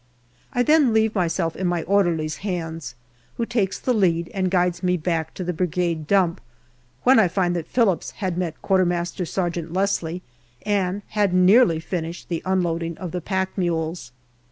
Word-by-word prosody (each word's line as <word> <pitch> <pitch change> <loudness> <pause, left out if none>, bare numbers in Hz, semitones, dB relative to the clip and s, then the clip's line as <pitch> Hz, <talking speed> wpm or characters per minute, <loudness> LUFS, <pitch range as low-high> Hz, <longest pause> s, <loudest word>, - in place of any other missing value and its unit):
I 245 -1 +1
then 300 -4 +4
leave 220 0 +3
myself 170 -3 0
in 185 - -1
my 175 -2 0
orderly's 170 -5 +1
hands, 165 - -4 0.4
who 235 - 0
takes 210 -5 -1
the 255 - 0
lead 170 -6 +1
and 185 -2 0
guides 180 -1 +1
me 180 -1 +1
back 160 -1 -2
to 185 - -4
the 180 0 -2
Brigade 170 -2 -1
dump, 185 -4 +2 0.6
when 255 -1 +6
I 205 - +5
find 175 0 0
that 170 -3 -3
Phillips 220 -8 +1
had 185 -4 -3
met 175 -3 -3
Q.M.S. 175 -2 0 0.2
Leslie 175 0 -2 0.4
and 200 -1 0
had 205 -4 +1
nearly 185 -1 +5
finished 165 0 -5
the 170 -2 -2
unloading 170 -3 -1
of 180 -3 -6
the 180 - -3
pack 190 +2 -2
mules. 165 -6 -2
180 Hz, 160 wpm, -23 LUFS, 170-195 Hz, 0.6 s, when